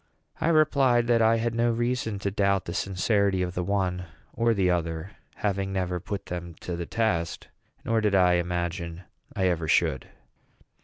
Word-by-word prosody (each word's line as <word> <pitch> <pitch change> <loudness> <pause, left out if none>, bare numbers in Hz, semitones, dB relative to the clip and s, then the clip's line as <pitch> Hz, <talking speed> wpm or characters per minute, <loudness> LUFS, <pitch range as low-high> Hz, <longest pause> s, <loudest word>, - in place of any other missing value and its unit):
I - - -1
replied 140 -7 +4
that 120 -1 +3
I 115 +1 +5
had 115 0 -1
no 120 +1 +2
reason 120 -2 -1
to 100 - +1
doubt 100 -1 +1
the 85 - -5
sincerity 100 0 +1
of 90 -1 -3
the 90 - -2
one 90 -2 -1 0.3
or 115 0 +2
the 95 -2 +2
other, 85 +1 -2 0.2
having 100 -1 -1
never 90 -2 -1
put 100 +3 -5
them 85 -1 -6
to 90 - -4
the 85 -1 -5
test, 95 -8 -1 0.4
nor 115 -1 +1
did 105 -2 +2
I 90 -2 +5
imagine 85 0 -2 0.3
I 95 - +1
ever 85 -3 0
should. 65 -4 +1
95 Hz, 170 wpm, -26 LUFS, 90-115 Hz, 0.4 s, I